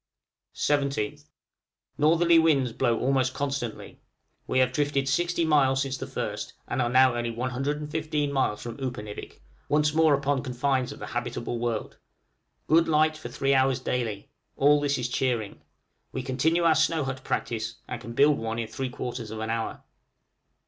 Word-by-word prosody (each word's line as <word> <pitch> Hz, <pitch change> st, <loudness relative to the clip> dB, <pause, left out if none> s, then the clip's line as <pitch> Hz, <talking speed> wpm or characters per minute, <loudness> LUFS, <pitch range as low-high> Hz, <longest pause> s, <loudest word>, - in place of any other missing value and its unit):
17th. 140 Hz, -6 st, 0 dB, 0.7 s
Northerly 165 Hz, +3 st, +4 dB
winds 140 Hz, -7 st, +3 dB
blow 115 Hz, 0 st, +1 dB
almost 130 Hz, -1 st, +1 dB
constantly. 140 Hz, -5 st, -4 dB, 0.5 s
We 130 Hz, -, 0 dB
have 130 Hz, -1 st, +4 dB
drifted 140 Hz, 0 st, 0 dB
60 170 Hz, +4 st, +1 dB
miles 135 Hz, -3 st, +3 dB
since 135 Hz, -1 st, -3 dB
the -, -, -6 dB
1st, -, -, -4 dB
and -, -, -1 dB
are 130 Hz, +1 st, +4 dB
only 120 Hz, 0 st, -1 dB
115 145 Hz, +5 st, -2 dB
miles 130 Hz, -6 st, 0 dB
from 120 Hz, -1 st, -6 dB
Upernivik, 120 Hz, -6 st, -6 dB, 0.3 s
once 150 Hz, 0 st, +2 dB
more 160 Hz, -2 st, +5 dB
upon 140 Hz, -1 st, 0 dB
confines 130 Hz, 0 st, -1 dB
of -, -, -9 dB
the -, -, -7 dB
habitable 120 Hz, 0 st, -3 dB
world! 115 Hz, -2 st, -3 dB, 0.7 s
good 165 Hz, +2 st, +4 dB
light 155 Hz, 0 st, +3 dB
for 155 Hz, -, -8 dB
three 140 Hz, 0 st, +1 dB
hours 130 Hz, -1 st, +3 dB
daily; 115 Hz, -6 st, -3 dB, 0.3 s
all 145 Hz, +1 st, +5 dB
this 140 Hz, -1 st, +1 dB
is 125 Hz, -, -1 dB
cheering. 120 Hz, -4 st, -1 dB, 0.5 s
We 130 Hz, -, -4 dB
continue 155 Hz, +7 st, +1 dB
our 165 Hz, -1 st, +5 dB
snow 155 Hz, 0 st, +2 dB
hut 130 Hz, -1 st, -5 dB
practice, 115 Hz, 0 st, -2 dB
and 120 Hz, -, -5 dB
can 115 Hz, -1 st, -8 dB
build 145 Hz, +4 st, +4 dB
one 115 Hz, 0 st, -3 dB
in 115 Hz, -1 st, -2 dB
three 130 Hz, -1 st, -3 dB
quarters 120 Hz, -2 st, -5 dB
of 110 Hz, 0 st, -6 dB
an 110 Hz, 0 st, -2 dB
hour. 115 Hz, 0 st, -3 dB
135 Hz, 160 wpm, -27 LUFS, 120-150 Hz, 0.7 s, more